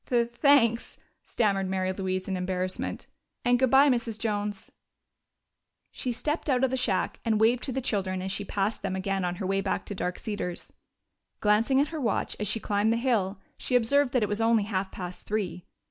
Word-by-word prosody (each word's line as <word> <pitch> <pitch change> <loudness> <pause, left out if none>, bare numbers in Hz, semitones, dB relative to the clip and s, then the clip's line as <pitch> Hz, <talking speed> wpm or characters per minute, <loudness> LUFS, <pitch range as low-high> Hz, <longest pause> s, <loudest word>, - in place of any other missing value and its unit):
"Thanks," 235 -3 +3 0.3
stammered 195 -4 0
Mary 185 0 0
Louise 185 -1 -2
in 190 - -1
embarrassment.... 185 0 -3 0.4
"And 245 0 +4
good 260 -1 +3
bye, 270 +3 +6
Mrs. 235 -4 0
Jones." 205 -2 -3 1.2
She 250 - -3
stepped 300 +6 -2
out 255 -1 +2
of 265 - +3
the - - +1
shack 225 -8 0
and 220 -2 +1
waved 230 +3 +4
to 270 - -3
the 265 +1 -2
children 190 -5 -1
as 190 - -3
she 205 - -3
passed 200 +2 -1
them 195 -1 -2
again 195 0 -1
on 175 0 -1
her 185 - -5
way 195 +1 +1
back 195 -1 -2
to - - -5
Dark 180 -2 -3
Cedars. 205 -5 -5 0.7
Glancing 220 +6 +3
at 290 +2 +2
her 320 -2 -5
watch 230 -5 -1
as 210 - -2
she 225 - 0
climbed 210 +1 +1
the 230 - +2
hill, 220 -6 +1 0.2
she 250 - -1
observed 250 +3 +3
that 250 -4 +3
it - - +1
was 205 +2 -1
only 225 -1 +3
half 195 -2 -2
past 180 -1 -7
three. 180 -5 -2
210 Hz, 195 wpm, -28 LUFS, 190-245 Hz, 1.2 s, bye